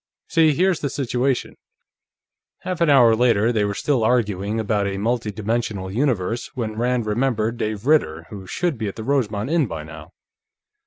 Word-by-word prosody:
"See, 160 Hz, -3 st, +4 dB
here's 185 Hz, +1 st, +2 dB
the 140 Hz, -, -2 dB
situation 130 Hz, -1 st, -1 dB, 0.6 s
..." -, -, -68 dB
Half 185 Hz, -2 st, -4 dB
an 170 Hz, -, +4 dB
hour 120 Hz, -5 st, +6 dB
later, 115 Hz, -1 st, +3 dB
they 110 Hz, -3 st, +1 dB
were 100 Hz, 0 st, -1 dB
still 130 Hz, -2 st, 0 dB
arguing 105 Hz, -3 st, 0 dB
about 105 Hz, -2 st, 0 dB
a 100 Hz, 0 st, -3 dB
multidimensional 110 Hz, -2 st, -2 dB
universe 115 Hz, -3 st, -1 dB
when 110 Hz, -4 st, -3 dB
Rand 120 Hz, 0 st, 0 dB
remembered 115 Hz, 0 st, 0 dB
Dave 110 Hz, 0 st, -3 dB
Ritter, 80 Hz, -, +2 dB
who 95 Hz, -3 st, -8 dB
should 170 Hz, -, -2 dB
be 110 Hz, -, -2 dB
at 100 Hz, -, -5 dB
the 110 Hz, -, -6 dB
Rosemont 120 Hz, -3 st, -1 dB
Inn 165 Hz, -5 st, +2 dB
by 80 Hz, -5 st, -6 dB
now. 80 Hz, 0 st, -11 dB
115 Hz, 170 wpm, -22 LUFS, 105-130 Hz, 0.6 s, hour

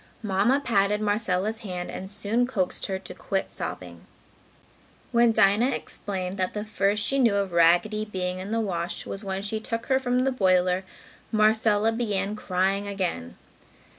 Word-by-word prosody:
Mamma 210 Hz, +7 st, +2 dB
patted 210 Hz, -5 st, +1 dB
Marcella's 210 Hz, 0 st, 0 dB
hand 180 Hz, -5 st, -5 dB
and 190 Hz, -, -7 dB
soon 210 Hz, +4 st, 0 dB
coaxed 195 Hz, -8 st, -1 dB
her 190 Hz, -, -2 dB
to 190 Hz, -1 st, -8 dB
quit 195 Hz, -1 st, -3 dB
sobbing. -, -, -7 dB, 1.0 s
When 235 Hz, -1 st, +4 dB
Dinah 220 Hz, +3 st, +4 dB
explained 190 Hz, -2 st, -5 dB
that 185 Hz, +1 st, -1 dB
the 210 Hz, 0 st, -3 dB
first 205 Hz, -1 st, +1 dB
she 275 Hz, -, +1 dB
knew 230 Hz, -6 st, +4 dB
of 200 Hz, -2 st, 0 dB
Raggedy 175 Hz, +6 st, +3 dB
being 185 Hz, -3 st, -3 dB
in 190 Hz, +2 st, -6 dB
the 225 Hz, +1 st, 0 dB
wash 175 Hz, -5 st, -3 dB
was 195 Hz, -, -5 dB
when 195 Hz, 0 st, -3 dB
she 215 Hz, +2 st, -2 dB
took 230 Hz, +1 st, -4 dB
her 265 Hz, -1 st, +2 dB
from 250 Hz, -1 st, +1 dB
the 265 Hz, +1 st, +1 dB
boiler, 185 Hz, -5 st, +2 dB, 0.5 s
Marcella 215 Hz, 0 st, +3 dB
began 210 Hz, -3 st, -1 dB
crying 195 Hz, 0 st, 0 dB
again. 185 Hz, -, -3 dB
205 Hz, 160 wpm, -26 LUFS, 190-220 Hz, 1.0 s, When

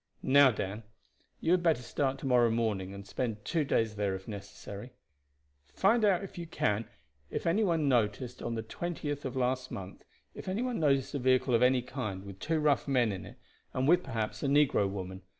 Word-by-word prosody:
Now, 140 Hz, +1 st, +7 dB
Dan, 105 Hz, -2 st, -3 dB, 0.6 s
you 160 Hz, -, +1 dB
had 180 Hz, 0 st, +4 dB
better 160 Hz, -7 st, +2 dB
start 135 Hz, +2 st, -1 dB
to 135 Hz, -, -8 dB
morrow 125 Hz, -3 st, +4 dB
morning, 110 Hz, -5 st, -1 dB
and 100 Hz, 0 st, -9 dB
spend 105 Hz, 0 st, -3 dB
two 160 Hz, +4 st, +1 dB
days 110 Hz, -6 st, 0 dB
there 100 Hz, -2 st, 0 dB
if 95 Hz, 0 st, -9 dB
necessary; 105 Hz, +2 st, -8 dB, 0.8 s
find 220 Hz, +4 st, +3 dB
out 200 Hz, -2 st, +3 dB
if 190 Hz, -, -8 dB
you 170 Hz, -, -5 dB
can 110 Hz, -7 st, 0 dB, 0.4 s
if -, -, -4 dB
on 165 Hz, +1 st, +3 dB
the 125 Hz, -, 0 dB
twentieth 150 Hz, -4 st, -4 dB
of 130 Hz, -, -4 dB
last 125 Hz, 0 st, 0 dB
month 95 Hz, 0 st, -8 dB, 0.3 s
any 190 Hz, +6 st, -3 dB
one 250 Hz, -5 st, -2 dB
noticed 140 Hz, -4 st, +2 dB
a 140 Hz, -, -1 dB
vehicle 130 Hz, 0 st, +2 dB
of 115 Hz, -, +4 dB
any 125 Hz, 0 st, +4 dB
kind, 110 Hz, -8 st, -5 dB
with 100 Hz, -1 st, -10 dB
two 160 Hz, +10 st, 0 dB
rough 150 Hz, -2 st, +2 dB
men 125 Hz, -5 st, +2 dB
in 95 Hz, -, -6 dB
it, -, -, -13 dB, 0.4 s
and 130 Hz, +1 st, +1 dB
with, 175 Hz, +3 st, +5 dB
perhaps, 110 Hz, -4 st, -3 dB
a -, -, 0 dB
negro 140 Hz, -8 st, +3 dB
woman. 95 Hz, -1 st, -6 dB
125 Hz, 185 wpm, -31 LUFS, 105-150 Hz, 0.8 s, Now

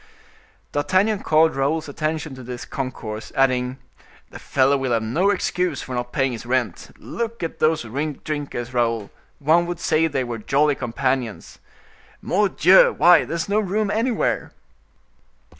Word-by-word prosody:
D'Artagnan 190 Hz, +8 st, +1 dB
called 160 Hz, -4 st, +3 dB
Raoul's 150 Hz, +4 st, 0 dB
attention 155 Hz, 0 st, -3 dB
to 130 Hz, -, -10 dB
this 120 Hz, -2 st, -7 dB
concourse, 110 Hz, -4 st, -6 dB
adding: 130 Hz, -1 st, +1 dB, 0.5 s
"The -, -, -10 dB
fellow 135 Hz, +1 st, +2 dB
will 135 Hz, -3 st, -1 dB
have 115 Hz, -1 st, +1 dB
no 160 Hz, -, +1 dB
excuse 180 Hz, -5 st, -1 dB
for 130 Hz, -, -7 dB
not 120 Hz, 0 st, -3 dB
paying 135 Hz, -2 st, +1 dB
his 115 Hz, -, -6 dB
rent. 120 Hz, -6 st, -2 dB
Look 230 Hz, -4 st, -5 dB
at 165 Hz, -, -4 dB
those 155 Hz, -2 st, +2 dB
drinkers, 140 Hz, 0 st, -4 dB
Raoul, 115 Hz, -4 st, 0 dB, 0.3 s
one 165 Hz, +4 st, +3 dB
would 175 Hz, -1 st, -4 dB
say 160 Hz, -1 st, +2 dB
they 140 Hz, -4 st, -1 dB
were 120 Hz, -2 st, -5 dB
jolly 145 Hz, +6 st, +2 dB
companions. 130 Hz, -2 st, -3 dB, 0.6 s
Mordioux! 190 Hz, -2 st, +4 dB
why, 175 Hz, -1 st, +6 dB
there -, -, -4 dB
is 165 Hz, -, -2 dB
no 205 Hz, +1 st, +2 dB
room 210 Hz, 0 st, -1 dB
anywhere!" 230 Hz, +2 st, -1 dB
145 Hz, 145 wpm, -22 LUFS, 125-170 Hz, 0.6 s, why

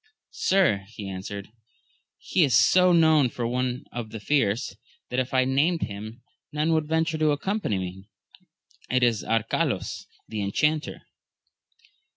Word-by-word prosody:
Sir, 170 Hz, -, +3 dB
he 105 Hz, -2 st, -8 dB
answered, 95 Hz, +1 st, -6 dB, 0.7 s
he 180 Hz, -, +1 dB
is 135 Hz, -7 st, +3 dB
so 180 Hz, +11 st, +5 dB
known 160 Hz, -5 st, +5 dB
for 120 Hz, 0 st, -4 dB
one 125 Hz, +1 st, -2 dB
of 120 Hz, -2 st, -5 dB
the 110 Hz, -, -7 dB
fierce, 115 Hz, -3 st, 0 dB, 0.4 s
that 125 Hz, -, 0 dB
if 130 Hz, +1 st, -2 dB
I 130 Hz, -, +3 dB
had 130 Hz, -, 0 dB
named 160 Hz, +6 st, +2 dB
him 110 Hz, +3 st, -7 dB, 0.3 s
none 150 Hz, +2 st, +1 dB
would 155 Hz, -1 st, +1 dB
venture 160 Hz, 0 st, 0 dB
to 155 Hz, -1 st, +3 dB
accompany 150 Hz, -, -1 dB
me, 95 Hz, +2 st, -6 dB, 0.4 s
— -, -, -61 dB, 0.3 s
it 125 Hz, 0 st, +2 dB
is 115 Hz, -3 st, +2 dB
Arcalaus, 115 Hz, 0 st, -1 dB, 0.2 s
the 110 Hz, -1 st, -4 dB
Enchanter. 150 Hz, +10 st, 0 dB
125 Hz, 150 wpm, -25 LUFS, 110-155 Hz, 0.7 s, so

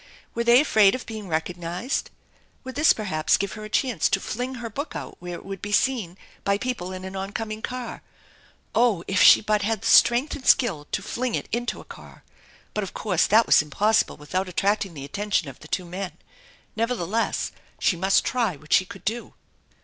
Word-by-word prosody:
Were 235 Hz, -, -1 dB
they 235 Hz, +1 st, +6 dB
afraid 215 Hz, -8 st, +4 dB
of 255 Hz, -, -7 dB
being 215 Hz, -3 st, -7 dB
recognized? 175 Hz, -, -3 dB, 0.5 s
Would 260 Hz, 0 st, -7 dB
this 300 Hz, +3 st, +5 dB
perhaps 170 Hz, -8 st, +1 dB
give 200 Hz, -, -2 dB
her 215 Hz, -, -8 dB
a 215 Hz, -, -7 dB
chance 235 Hz, -, +1 dB
to 195 Hz, -, +2 dB
fling 250 Hz, +6 st, -4 dB
her 235 Hz, -2 st, -5 dB
book 280 Hz, +8 st, -6 dB
out -, -, -7 dB
where 175 Hz, 0 st, -6 dB
it -, -, -11 dB
would 195 Hz, -2 st, -7 dB
be 205 Hz, -, -5 dB
seen 205 Hz, -6 st, +1 dB, 0.3 s
by 200 Hz, 0 st, +2 dB
people 205 Hz, -5 st, -4 dB
in 185 Hz, 0 st, -7 dB
an 190 Hz, +1 st, -7 dB
oncoming 215 Hz, +3 st, -4 dB
car? 250 Hz, 0 st, -5 dB, 0.7 s
Oh, 225 Hz, -6 st, +2 dB
if 195 Hz, -, +1 dB
she -, -, +8 dB
but 210 Hz, -1 st, +1 dB
had 215 Hz, 0 st, -1 dB
the -, -, -6 dB
strength 240 Hz, +5 st, +5 dB
and 270 Hz, -, -9 dB
skill 175 Hz, -, +3 dB
to 195 Hz, -, -2 dB
fling 245 Hz, +3 st, -2 dB
it -, -, -4 dB
into 240 Hz, +1 st, -2 dB
a -, -, -12 dB
car. -, -, -13 dB, 0.5 s
But 210 Hz, -, -1 dB
of 195 Hz, -, -7 dB
course 180 Hz, -6 st, +1 dB
that 225 Hz, +3 st, +5 dB
was -, -, +6 dB
impossible 205 Hz, +9 st, +1 dB
without 185 Hz, +6 st, -3 dB
attracting 195 Hz, 0 st, 0 dB
the 140 Hz, -1 st, -7 dB
attention 200 Hz, +2 st, -1 dB
of 130 Hz, -, -12 dB
the -, -, -13 dB
two 180 Hz, -, -2 dB
men. 185 Hz, +2 st, -5 dB, 0.6 s
Nevertheless, 230 Hz, -2 st, -1 dB, 0.3 s
she -, -, +2 dB
must 190 Hz, +3 st, +2 dB
try 230 Hz, -8 st, 0 dB
what 150 Hz, +1 st, -5 dB
she 185 Hz, -, +5 dB
could 195 Hz, -, -12 dB
do. 230 Hz, +2 st, -3 dB
205 Hz, 200 wpm, -24 LUFS, 185-235 Hz, 0.7 s, she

